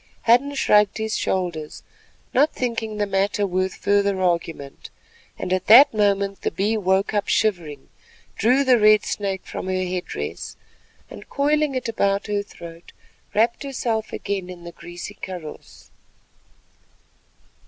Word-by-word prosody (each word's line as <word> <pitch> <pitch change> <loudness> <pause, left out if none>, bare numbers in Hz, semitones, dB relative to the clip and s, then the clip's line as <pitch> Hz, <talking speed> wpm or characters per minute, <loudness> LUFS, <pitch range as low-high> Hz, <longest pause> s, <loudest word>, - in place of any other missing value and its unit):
Hadden 255 +5 +3
shrugged 210 -6 +3
his 220 0 -2
shoulders, 170 -5 -3 0.5
not 290 +4 +4
thinking 225 -3 -3
the 205 - +1
matter 200 +1 0
worth 185 0 -1
further 200 -1 +1
argument, 170 -6 -2 0.5
and 180 - -3
at 185 0 -2
that 245 +6 +8
moment 200 -2 +1
the - - 0
Bee 205 +3 -1
woke 195 0 +1
up 205 -1 0
shivering, 170 -10 -1 0.5
drew 250 +6 +3
the 255 -3 +4
red 215 0 +5
snake 195 -2 -3
from - - -6
her 185 0 -1
head 180 0 -3
dress - - -6 0.6
and - - -11
coiling 295 0 +1
it 255 0 -2
about 200 -2 0
her 205 -1 -1
throat 170 -4 -12 0.4
wrapped 230 +3 +2
herself 235 -6 -3
again 195 -3 -4
in 175 -1 -10
the 170 - -8
greasy 175 +4 -9
kaross. 180 -6 -10
200 Hz, 140 wpm, -22 LUFS, 185-220 Hz, 0.6 s, that